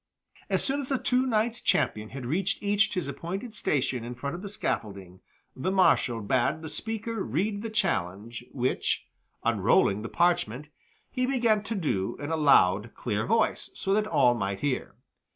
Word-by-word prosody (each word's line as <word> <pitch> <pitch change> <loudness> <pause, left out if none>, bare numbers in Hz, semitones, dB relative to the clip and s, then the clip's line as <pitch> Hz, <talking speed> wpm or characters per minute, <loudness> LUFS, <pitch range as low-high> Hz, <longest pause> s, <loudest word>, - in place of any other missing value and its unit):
As - - +3
soon 280 +1 +1
as 265 - -6
the 270 - +2
two 255 +1 +1
knights 230 0 0
champion 105 0 +1
had 130 -2 -7
reached 185 - -1
each 205 +1 +2
his 180 -6 -2
appointed 190 - -5
station 130 - 0
in 120 +1 -6
front 140 +5 -4
of 175 - -7
the 200 - -6
scaffolding, 100 - -4 0.4
the 135 +8 -2
Marshal 180 -11 +3
bade 130 +8 0
the 160 - -5
speaker 225 +2 -4
read 200 - -1
the 225 - -4
challenge, 115 - -1
which, 130 -1 0 0.4
unrolling 100 +2 +3
the 115 - -5
parchment, 150 -6 +1 0.4
he 255 -1 0
began 235 -5 +2
to 225 +2 -4
do 120 - -1
in 145 +2 -5
a - - +2
loud, 115 - +4
clear 110 -3 -2
voice, 225 +2 +1
so 195 - 0
that 215 +1 +2
all 140 -9 +4
might 100 -4 -3
hear. 140 -3 -2
160 Hz, 170 wpm, -27 LUFS, -, 0.4 s, loud